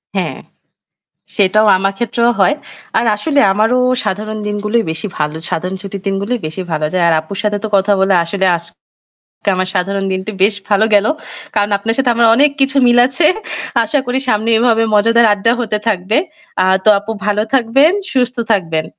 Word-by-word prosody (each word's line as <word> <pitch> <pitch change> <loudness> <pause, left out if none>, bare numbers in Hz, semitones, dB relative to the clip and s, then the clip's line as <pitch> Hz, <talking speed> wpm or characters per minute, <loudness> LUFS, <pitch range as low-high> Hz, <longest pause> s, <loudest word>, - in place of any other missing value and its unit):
হ্যাঁ। - - -3 1.0
সেটাও 210 +1 +3
আমার 195 +1 0
ক্ষেত্রেও 235 0 0
হয়। 240 +10 +3 0.4
আর - - +1
আসলে 285 +6 0
আমারও 220 +5 +1 0.3
সাধারণ 215 +3 -3
দিনগুলোই 210 +2 -1
বেশি 160 +6 -4
ভালো। 150 0 -2 0.2
সাধারণ 180 +3 -3
ছুটির 195 -1 -7
দিনগুলোই 200 +5 -2
বেশি 160 +4 -6
ভালো 155 -1 -1
যায়। 175 -2 +1
আর - - +3
আপুর 195 +5 -9
সাথে 210 -1 0
তো - - -1
কথা 200 +1 +2
বলে 195 0 +2
আসলে 190 +2 -2
আজ 170 - -5 0.9
আমার 185 0 -1
সাধারণ 195 +2 -1
দিনটি 190 +3 -4
বেশ 205 0 +3
ভালো 210 +2 +3
গেল। 205 +1 +4 0.5
কারণ 205 0 +1
আপনার 225 +3 -2
সাথে 260 -2 +1
আমার 235 -1 +4
অনেক 290 +3 +4
কিছু 270 +1 +1
মিল 240 0 +4
আছে 285 +5 +1 0.6
আশা 290 - 0
করি 250 +1 -1
সামনে 220 +1 0
এভাবে 225 -1 +2
মজাদার 230 +2 +4
আড্ডা 205 +3 +1
হতে 215 -2 -2
থাকবে। 205 +2 0 0.5
আর 190 0 +3
তো - - +6
আপু 210 +2 -7
ভালো 210 0 +1
থাকবেন, 270 +7 +3 0.2
সুস্থ 250 -1 0
থাকবেন। 165 -6 0
210 Hz, 175 wpm, -15 LUFS, 195-235 Hz, 1.0 s, তো